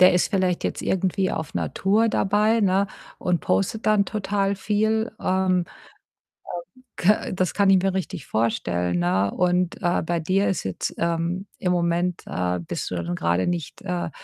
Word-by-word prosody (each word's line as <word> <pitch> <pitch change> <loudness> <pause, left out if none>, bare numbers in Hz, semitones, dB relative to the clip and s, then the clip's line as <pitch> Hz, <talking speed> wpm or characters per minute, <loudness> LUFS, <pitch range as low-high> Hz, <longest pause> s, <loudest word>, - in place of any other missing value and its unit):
der 185 0 +8
ist 180 - +2
vielleicht 185 -3 +1
jetzt - - -2
irgendwie 190 0 0
auf 160 -1 -4
'ner - - -2
Tour 215 +4 +2
dabei, 210 +3 +2
ne, 195 0 +3 0.3
und 180 -2 0
postet 95 - 0
dann 210 -2 +4
total 200 -1 -1
viel. 220 +3 0
Ähm, 190 0 +1
ähm, 180 -1 +2 1.3
k 210 +4 +2
das 185 -1 0
kann 200 -1 +3
ich 190 -2 +6
mir 195 -1 +1
richtig 190 -2 -4
vorstellen, 90 -6 0
ne? 95 +3 +1
Und, 180 +4 0
äh, 175 -1 +1
bei 170 0 -1
dir 190 +5 +1
ist 190 - -1
jetzt, 95 -1 -3
ähm 170 +3 -1 0.2
im 180 -1 +2
Moment, 175 0 0
äh, 90 0 -1
bist 85 - -4
du 90 - -4
dann 85 0 -2
grade 85 +2 +1
nicht, 170 -4 -3
äh, 180 -3 -2
180 Hz, 175 wpm, -24 LUFS, 165-195 Hz, 1.3 s, der